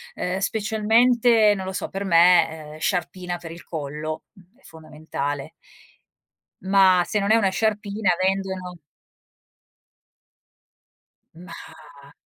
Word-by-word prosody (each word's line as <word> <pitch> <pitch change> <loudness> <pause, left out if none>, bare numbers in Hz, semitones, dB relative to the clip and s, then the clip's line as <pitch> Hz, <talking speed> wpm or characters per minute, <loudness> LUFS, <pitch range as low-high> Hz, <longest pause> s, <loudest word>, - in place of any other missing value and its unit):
Uhm 180 +1 -3
specialmente, 220 +2 +3
non 190 -1 -6
lo 190 - -4
so, 190 - -4
per 195 +1 -5
me, 165 -4 +3
uhm, - - -11
sciarpina 180 0 -3
per 165 -1 -10
il 170 +1 -11
collo 155 0 -6 0.3
è 275 - -29
fondamentale. 155 -2 -6 1.1
Ma, 190 -2 +4
se 210 - -1
non 200 +1 0
è - - +6
una 200 -4 +2
sciarpina, 210 0 -1
vendono 190 -2 -2 2.6
Mah. 150 -4 -14
185 Hz, 110 wpm, -23 LUFS, 160-205 Hz, 2.6 s, è